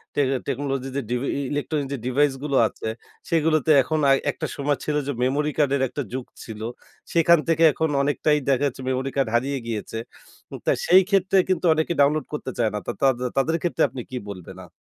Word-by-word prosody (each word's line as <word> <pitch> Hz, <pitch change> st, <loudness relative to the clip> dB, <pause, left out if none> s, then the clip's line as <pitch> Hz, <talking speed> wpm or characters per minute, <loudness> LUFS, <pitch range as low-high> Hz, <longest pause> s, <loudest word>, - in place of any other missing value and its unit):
Tech 145 Hz, -2 st, +2 dB, 0.2 s
technology 135 Hz, -1 st, -2 dB
যে, 140 Hz, -, 0 dB
DV 125 Hz, +3 st, -1 dB
এ -, -, -1 dB
এ -, -, -1 dB
electronic 145 Hz, -1 st, -2 dB
যে, -, -, -2 dB
device 140 Hz, +2 st, +2 dB
গুলো 140 Hz, -2 st, 0 dB
আছে, 110 Hz, -, -7 dB, 0.4 s
সেগুলোতে 155 Hz, -2 st, +2 dB
এখন 155 Hz, +2 st, -1 dB
আর 135 Hz, -, +6 dB, 0.2 s
একটা -, -, -5 dB
সময় 145 Hz, 0 st, 0 dB
ছিল 150 Hz, -, -1 dB
যে, 145 Hz, -, 0 dB
মেমোরি 145 Hz, +4 st, +1 dB
কার্ডের 140 Hz, -2 st, +2 dB
একটা 145 Hz, -, -4 dB
যুগ 130 Hz, -1 st, -4 dB, 0.2 s
ছিল। 110 Hz, -1 st, -9 dB, 0.5 s
সেখান 170 Hz, 0 st, +5 dB
থেকে 165 Hz, 0 st, +3 dB
এখন 160 Hz, -1 st, 0 dB
অনেকটাই 150 Hz, +1 st, +2 dB
দেখা 135 Hz, +1 st, +2 dB
যাচ্ছে 130 Hz, 0 st, -6 dB
মেমোরি 130 Hz, +1 st, -1 dB
কার্ড 135 Hz, -4 st, +1 dB
হারিয়ে 135 Hz, +4 st, 0 dB
গিয়েছে। 110 Hz, 0 st, -4 dB, 0.7 s
তো -, -, +3 dB, 0.2 s
সেই 185 Hz, +2 st, +8 dB
ক্ষেত্রে 195 Hz, -1 st, +2 dB
কিন্তু 185 Hz, -1 st, 0 dB
অনেকে 160 Hz, +2 st, 0 dB
ডাউনলোড 150 Hz, +2 st, +3 dB
করতে 135 Hz, -3 st, -4 dB
চায় 115 Hz, -2 st, +2 dB
না। 105 Hz, -, -2 dB
তা -, -, 0 dB
তাদে 130 Hz, -2 st, +2 dB
তাদের 160 Hz, +5 st, +2 dB
ক্ষেত্রে 175 Hz, -, 0 dB
আপনি 125 Hz, 0 st, -6 dB
কি 125 Hz, -, -3 dB
বলবেন? 90 Hz, -4 st, -9 dB
আ -, -, -20 dB
140 Hz, 200 wpm, -23 LUFS, 130-155 Hz, 0.7 s, সেই